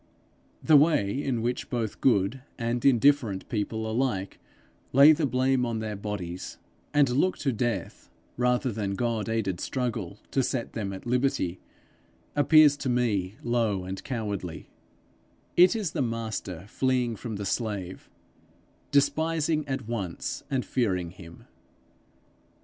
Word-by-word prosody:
The 155 -2 +7
way 145 -9 +3
in 120 -4 -1
which 120 +1 -2
both 115 -4 -3
good 115 +1 +2 0.2
and 120 0 -2
indifferent 125 -5 +3
people 110 -1 -2
alike 110 -4 -1 0.5
lay 140 +4 +9
the 155 -1 +2
blame 130 0 +2
on 115 -2 -1
their 110 -1 -3
bodies, 100 -4 -5 0.3
and 145 -1 +4
look 145 +9 +1
to 135 -3 -1
death 120 +1 -3 0.3
rather 125 +1 +1
than 100 -2 -2
God 115 -1 -1
aided 100 -6 -1
struggle 115 -7 -3
to 135 - +2
set 125 -2 -2
them 100 -3 -3
at 95 - -8
liberty, 120 -8 0 0.8
appears 150 0 +6
to 135 - -3
me 110 -6 0
low 115 -5 0
and 95 +1 -6
cowardly: 100 - -4 0.8
it 180 +4 +6
is 205 -8 -2
the 155 - -2
master 110 -7 -3
fleeing 125 0 0
from 110 0 -6
the 100 0 -4
slave, 100 -4 -3 0.8
despising 155 +1 +1
at 135 -5 -3
once 100 -7 -4
and 130 -2 -1
fearing 95 -9 -1
him. 85 -2 -13
120 Hz, 135 wpm, -27 LUFS, 100-135 Hz, 0.8 s, lay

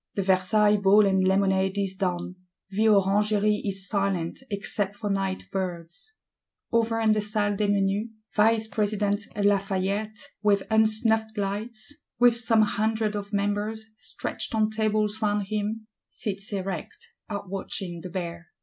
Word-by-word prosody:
The 195 - 0
Versailles 205 +3 +3
Ball 200 +1 +5
and 190 -1 +3
lemonade 190 0 +2
is 195 -1 -1
done; 180 -2 -2 0.4
the 215 +3 +2
Orangery 210 +1 +3
is 195 -1 -3
silent 195 -4 -1
except 200 -1 -1
for 205 0 -3
nightbirds. 190 - -4 0.6
Over 230 0 +2
in 220 -1 +3
the 215 - +1
Salle 205 -1 0
des 205 +1 0
Menus, 200 +2 +1 0.3
Vice 220 +1 +3
president 205 -1 0 0.2
Lafayette, 200 +1 0 0.2
with 205 -2 +3
unsnuffed 220 0 +2
lights, 215 +6 -4 0.2
"with 245 -1 +5
some 225 -2 +3
hundred 215 +1 0
of 205 0 -5
members, 205 +2 -2
stretched 220 - -4
on 215 0 +2
tables 215 0 0
round 205 -2 0
him," 215 +1 -2 0.2
sits 200 0 -5
erect; 195 - -4 0.3
outwatching 195 -3 -4
the 180 - -7
Bear. 170 -1 -5
205 Hz, 130 wpm, -26 LUFS, 195-215 Hz, 0.6 s, Ball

